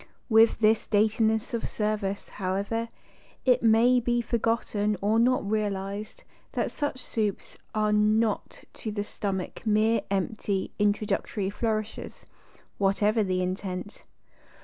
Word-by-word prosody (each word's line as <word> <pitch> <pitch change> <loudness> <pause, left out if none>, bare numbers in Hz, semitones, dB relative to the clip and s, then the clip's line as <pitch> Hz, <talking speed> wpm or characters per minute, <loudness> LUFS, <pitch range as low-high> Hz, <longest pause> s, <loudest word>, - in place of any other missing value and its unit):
With 225 0 +5
this 220 0 +3
daintiness 220 +1 +2
of 230 - -2
service, 210 -2 -2
however, 200 +4 -2 0.6
it 250 -2 +4
may 235 +3 +5
be 240 0 +1
forgotten 225 -3 0
or 210 +3 +2
not 245 -3 +2
realised 205 -1 -3 0.3
that - - -1
such 290 -3 -3
soups 210 -3 -3 0.2
are 215 0 +2
not 215 +1 +1
to 220 - -6
the 205 -1 -2
stomach 195 -2 -4
mere 220 +1 +3
empty, 195 0 -1
introductory 205 -1 0
flourishes, 215 0 -3 0.5
whatever 205 +3 +2
the 185 -2 0
intent. 185 +1 -4
215 Hz, 115 wpm, -27 LUFS, 200-225 Hz, 0.6 s, With